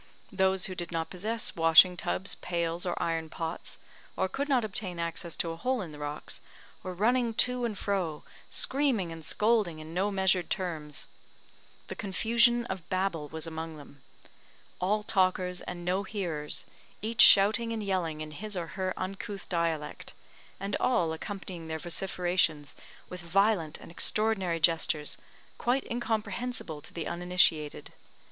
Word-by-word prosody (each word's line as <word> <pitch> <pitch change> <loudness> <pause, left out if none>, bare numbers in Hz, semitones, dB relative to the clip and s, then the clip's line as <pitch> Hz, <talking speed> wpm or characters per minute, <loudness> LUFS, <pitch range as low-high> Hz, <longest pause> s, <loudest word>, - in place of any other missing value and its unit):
Those 190 -1 +2
who 185 - -3
did 175 -1 -5
not 165 -1 -2
possess 215 +5 -2
washing 165 +2 +7
tubs, 190 +2 -2
pails, 170 0 -2
or 175 - -1
iron 165 -1 -1
pots, 165 +1 -4 0.4
or - - +2
could 280 +9 -3
not 250 -5 +3
obtain 195 -3 -2
access 170 0 -3
to 165 - -1
a - - -5
hole 255 +9 0
in 165 - -8
the 150 - -10
rocks, 145 0 -4 0.4
were 185 -1 -5
running 235 +3 +2
to 250 +1 +2
and 215 -4 -3
fro, 185 -7 -1 0.3
screaming 260 - +1
and 165 -1 -8
scolding 210 -1 +2
in 155 +1 -9
no 190 +4 +1
measured 190 -3 +2
terms. 160 -6 -3 0.8
The - - -6
confusion 235 +4 +3
of 185 -5 -6
Babel 185 -5 -1
was 160 +1 -4
among 160 -1 -5
them. 140 -1 -14 0.8
All 210 +3 +1
talkers 185 -3 +1
and 175 -1 -6
no 185 +2 +1
hearers 175 -8 -3 0.4
each 225 +1 +3
shouting 215 +4 +7
and 225 -2 -2
yelling 175 -6 -1
in 155 0 -6
his 200 +6 -6
or 170 -2 -3
her 190 -1 -2
uncouth 195 +1 -5
dialect, 165 -3 -2 0.4
and 195 +1 -2
all 175 -10 +2
accompanying 180 -1 -6
their 160 0 -2
vociferations 175 -3 0 0.3
with 180 0 -7
violent 175 -2 +2
and - - -12
extraordinary 195 -3 +1
gestures, 160 -2 +2 0.4
quite 255 +3 +1
incomprehensible 230 -6 -2
to - - -11
the 165 -2 -4
uninitiated. 170 -4 +1
180 Hz, 150 wpm, -30 LUFS, 165-210 Hz, 0.8 s, washing